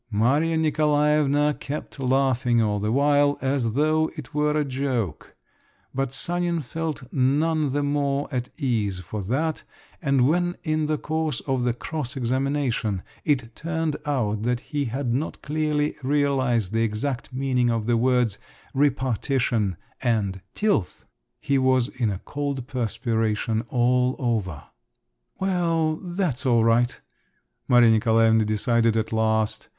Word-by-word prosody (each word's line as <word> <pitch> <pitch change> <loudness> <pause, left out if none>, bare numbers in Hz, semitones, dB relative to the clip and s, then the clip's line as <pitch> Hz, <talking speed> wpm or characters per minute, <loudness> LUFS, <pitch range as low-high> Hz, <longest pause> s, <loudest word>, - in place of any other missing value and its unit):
Maria 140 +10 +2
Nikolaevna 150 -1 +2
kept 145 0 -6
laughing 130 -2 +2
all 105 -2 +1
the 105 +2 -1
while, 145 +2 +3
as 130 -4 0
though 155 +3 +2
it 150 -6 -9
were 150 0 +1
a 150 - 0
joke; 130 - -3 0.6
but 135 -1 -1
Sanin 175 +3 -1
felt 160 +1 -4
none 145 +3 +2
the 145 +2 0
more 145 0 0
at 125 -2 -2
ease 110 - 0
for 100 +4 -6
that; 145 - -1 0.4
and 135 -5 +3
when 175 +3 +1
in 155 -2 0
the 155 0 0
course 155 -4 -2
of 130 -3 -1
the 120 - +2
"cross 145 -1 -5
examination" 130 -5 -1 0.2
it 125 -6 0
turned 160 -2 -2
out 115 -8 -1
that 120 +1 0
he 145 -2 0
had 125 0 -2
not 145 +6 -2
clearly 150 0 0
realised 130 -7 +1
the 115 - +2
exact 115 +4 -2
meaning 130 -2 +1
of 115 -2 0
the 120 +1 +2
words 120 -3 +2 0.3
"repartition" 130 - +1 0.2
and 105 -6 0
"tilth," 205 - 0 0.3
he 140 -2 +1
was 130 -2 +2
in 120 -4 -1
a 100 - -2
cold 140 -3 -3
perspiration 115 -3 -1
all 125 +1 +2
over. 105 - -2 0.8
"Well, 165 -4 +1
that's 175 -8 -2
all 120 -4 +3
right!" 120 +2 +2 0.7
Maria 120 -2 +6
Nikolaevna 110 0 +4
decided 115 +1 +2
at 110 0 -2
last. 110 -1 0
130 Hz, 135 wpm, -24 LUFS, 115-150 Hz, 0.8 s, Maria